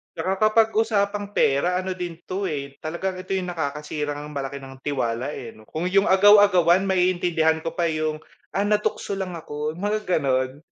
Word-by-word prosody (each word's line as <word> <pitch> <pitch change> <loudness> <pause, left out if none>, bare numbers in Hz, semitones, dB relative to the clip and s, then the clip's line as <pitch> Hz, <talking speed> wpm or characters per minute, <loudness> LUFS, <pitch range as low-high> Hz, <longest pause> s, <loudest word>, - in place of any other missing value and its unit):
'Tsaka 190 - -1
kapag 220 +1 +4
usapang 205 -2 0
pera 175 +6 +2
ano 185 0 -4
din 175 -2 -6
'to 195 +2 -2
eh, 140 -5 -4
talagang 185 +4 -3
ito 185 +1 -6
'yung 185 -1 -1
nakakasirang 150 -2 -4
malaki 140 -1 -5
ng 135 0 -11
tiwala 130 -1 -1
eh - - -8
'no. 110 - -16
Kung 165 +9 -3
'yung 195 +1 +3
agaw-agawan 190 -2 +6
maiintindihan 175 -4 +1
ko 165 - -2
pa 170 -1 0
'yung, 155 -1 -2 0.3
"Ah, 195 - 0
natukso 210 -1 0
lang 190 -2 -4
ako." 150 -2 -4
Mga 205 +5 -2
gano'n, 135 -4 0
175 Hz, 165 wpm, -24 LUFS, 150-190 Hz, 0.3 s, agaw-agawan